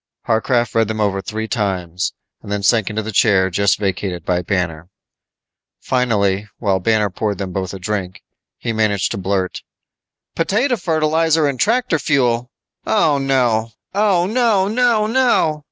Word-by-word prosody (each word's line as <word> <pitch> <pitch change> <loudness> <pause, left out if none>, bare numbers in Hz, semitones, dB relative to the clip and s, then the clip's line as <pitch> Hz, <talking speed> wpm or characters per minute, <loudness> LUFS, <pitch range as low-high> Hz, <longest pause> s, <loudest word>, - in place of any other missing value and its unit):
Harcraft 120 +1 +1
read 115 -1 +2
them 110 0 -4
over 100 -2 0
three 110 +2 -4
times, 95 -6 -2 0.3
then 100 0 -4
sank 110 0 +3
into 110 0 -3
the 110 - -5
chair 95 -3 +3
just 100 +2 +2
vacated 95 -3 -3
by 90 -1 0
Banner. 90 -3 -2 0.9
Finally 105 -5 0
while 100 -4 0
Banner 105 +1 +1
poured 105 +1 -2
them 95 -1 -5
both 95 -2 -3
a 95 - -6
drink 95 0 -4 0.3
he 115 - -3
managed 105 -3 0
to - - -3
blurt, 95 0 -2 0.7
"Potato 225 +10 +1
fertilizer 160 -3 +1
and 140 -3 -1
tractor 230 - +1
fuel 125 -3 +1 0.3
Oh, 155 -9 +2
no. 120 -5 +1 0.2
Oh, 195 -3 +2
no, 215 -3 +2
no, 230 -1 +2
no!" 225 -10 +2
110 Hz, 145 wpm, -18 LUFS, 95-155 Hz, 0.9 s, sank